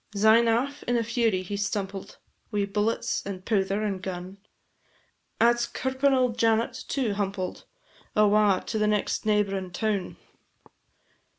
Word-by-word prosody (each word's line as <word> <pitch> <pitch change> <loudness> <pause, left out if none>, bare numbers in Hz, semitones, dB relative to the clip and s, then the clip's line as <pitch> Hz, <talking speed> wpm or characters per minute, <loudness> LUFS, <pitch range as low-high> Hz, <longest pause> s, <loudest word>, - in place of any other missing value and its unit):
Syne 220 +3 +5
aff 260 +6 0
in 245 0 +2
a 230 - +1
fury 225 -5 0
he 200 +3 -5
stumpled, 200 -1 -4 0.3
Wi' 205 -2 0
bullets, 210 +3 -1
and 190 -2 -7
pouther, 200 -1 0
and 195 -3 -2
gun; 185 +1 -6 1.0
At 235 +1 +4
's 235 - 0
curpin 260 +3 0
auld 255 -3 +1
Janet 225 0 +2
too 255 -7 0
humpled, 195 -2 -3 0.5
Awa 210 -2 +4
to 220 - -2
the 210 - +2
next 210 +1 0
neighb'rin' 195 -3 +1
town. 205 -1 -2
210 Hz, 135 wpm, -26 LUFS, 195-230 Hz, 1.0 s, Syne